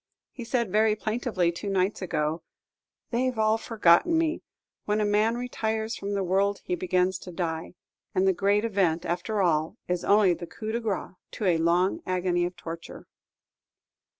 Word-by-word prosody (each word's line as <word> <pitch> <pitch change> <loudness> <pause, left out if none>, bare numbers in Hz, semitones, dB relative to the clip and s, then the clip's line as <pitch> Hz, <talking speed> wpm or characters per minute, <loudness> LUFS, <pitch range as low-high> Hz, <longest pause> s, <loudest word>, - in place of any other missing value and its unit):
He 245 - -8
said 235 -3 -1
very 215 +1 +3
plaintively, 215 -5 -1
two 170 +4 -5
nights 195 +1 0
ago, 160 -2 -1 0.7
"They 255 +2 +1
've 250 - -7
all 220 0 +2
forgotten 225 - +3
me. 325 0 0 0.4
When 210 +1 +1
a 210 - +2
man 210 +3 +2
retires 220 -2 -2
from 200 -1 -4
the 195 - 0
world 195 +2 +1
he - - -3
begins 180 +1 +1
to 180 - -9
die, 165 -1 -4 0.4
and 185 +1 +3
the 190 - +4
great 200 +4 +2
event, 185 -6 +1
after 190 +4 -1
all, 160 +3 +1
is 180 -1 -1
only 200 -3 +5
the 175 0 -7
coup 215 +4 -6
de 230 - -1
grace 215 -5 -3 0.2
to 215 - -4
a 175 -3 +3
long 175 +3 +2
agony 180 -1 +1
of 175 +1 -5
torture." 165 -1 -8
195 Hz, 175 wpm, -27 LUFS, 175-220 Hz, 0.7 s, only